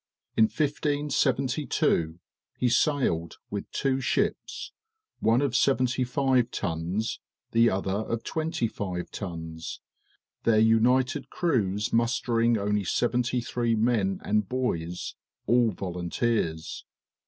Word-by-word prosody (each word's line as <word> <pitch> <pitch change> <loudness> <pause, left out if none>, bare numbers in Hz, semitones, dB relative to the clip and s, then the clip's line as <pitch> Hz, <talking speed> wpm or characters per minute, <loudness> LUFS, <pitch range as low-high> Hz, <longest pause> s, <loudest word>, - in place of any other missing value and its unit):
In 110 - +6
1572 140 - 0 0.4
he 125 - +2
sailed 120 - +1
with 100 - -4
two 135 -1 0
ships, - - -1 0.5
one 115 +5 +3
of 135 -3 0
seventy 130 -1 +2
five 125 -1 +2
tons, 90 +5 -2 0.3
the 115 0 +5
other 95 -1 -1 0.2
of 115 -1 -2
twenty 160 -7 -1
five 90 -5 -5
tons, 80 -4 -6 0.6
their 115 -2 +3
united 115 +4 +3
crews 105 - 0
mustering 115 0 +2
only 105 0 0
seventy 120 +5 +1
three 120 0 0
men 110 -4 +1
and 105 -1 0
boys, 90 -10 -2 0.3
all 120 +1 +4
volunteers. 90 -1 -2
115 Hz, 105 wpm, -27 LUFS, 95-125 Hz, 0.6 s, In